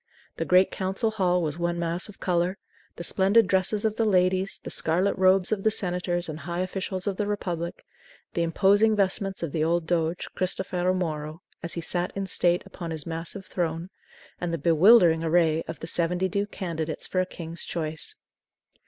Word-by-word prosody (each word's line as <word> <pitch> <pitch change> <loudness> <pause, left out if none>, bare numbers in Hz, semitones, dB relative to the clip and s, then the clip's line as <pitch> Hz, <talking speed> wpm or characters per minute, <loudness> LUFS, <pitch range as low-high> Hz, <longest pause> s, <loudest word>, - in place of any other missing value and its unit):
The - - -1
great 185 +1 +4
Council 195 +4 -1
Hall 180 -4 +1
was 155 +1 -3
one 175 0 0
mass 170 +3 -1
of 205 - -13
color; 180 +1 0 0.4
the - - -7
splendid 200 +5 +4
dresses 190 +3 +1
of 215 0 0
the 225 - +2
ladies, 185 -1 +2
the - - -6
scarlet 180 +5 +1
robes 185 0 +3
of 210 -2 0
the 220 - +3
senators 180 -4 -1
and 155 -1 -6
high 170 +3 -3
officials 185 0 -3
of 200 -2 -2
the 210 - -1
Republic, 175 -5 -3 0.5
the 170 - 0
imposing 205 +6 +3
vestments 195 -1 -1
of 165 - -2
the 155 0 0
old 170 +1 +1
doge, 165 0 -1
Cristofero 185 0 -1
Moro, 155 -2 -4 0.2
as 170 - -3
he 170 - -3
sat 175 +2 -1
in 195 0 -2
state 175 -1 +2
upon 170 -3 -7
his 160 -3 -4
massive 165 +4 -5
throne, 170 +1 -3 0.5
and 175 -1 -2
the 165 - -1
bewildering 165 +2 +5
array 165 -1 +3
of 165 - -6
the - - -4
seventy 175 +2 +1
two 200 +2 -1
candidates 165 -6 -4
for 185 - -1
a - - 0
king's 170 -1 -6
choice. 155 -2 -3
180 Hz, 185 wpm, -26 LUFS, 165-190 Hz, 0.5 s, bewildering